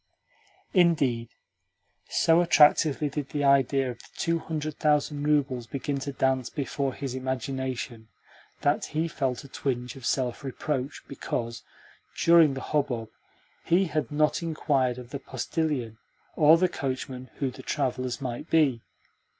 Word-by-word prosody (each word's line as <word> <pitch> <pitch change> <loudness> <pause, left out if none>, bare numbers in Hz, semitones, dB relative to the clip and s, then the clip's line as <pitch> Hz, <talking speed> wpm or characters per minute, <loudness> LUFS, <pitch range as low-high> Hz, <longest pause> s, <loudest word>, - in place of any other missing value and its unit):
Indeed, 140 - +3 0.8
so 165 +1 +4
attractively 150 -2 +4
did 145 -1 -4
the 145 -1 -2
idea 135 -1 +3
of 120 - -11
the - - -15
two 165 0 0
hundred 155 -2 -4
thousand 150 -1 +1
roubles 135 -5 +1
begin 140 +2 -3
to 140 +1 -4
dance 130 -2 0
before 140 -1 -2
his 135 -3 -4
imagination 130 -2 -4 0.5
that 145 +1 +1
he 160 +2 -1
felt 135 -6 -2
a - - -11
twinge 125 -2 -3
of 130 -3 -5
self 125 -2 -1
reproach 135 0 -3
because, 115 -3 -4 0.6
during 165 -4 +6
the 135 - -5
hubbub, 125 -7 -1 0.5
he 180 +3 +3
had 155 -7 -2
not 150 +2 +2
inquired 140 -6 0
of 125 0 -10
the 140 - -4
postillion 130 -3 -3 0.4
or 155 +1 +7
the 185 +2 +3
coachman 130 -3 -4
who 135 -2 -2
the - - -11
travellers 130 -3 -2
might 130 +4 -5
be. 145 -8 +3
140 Hz, 140 wpm, -27 LUFS, 125-150 Hz, 0.8 s, or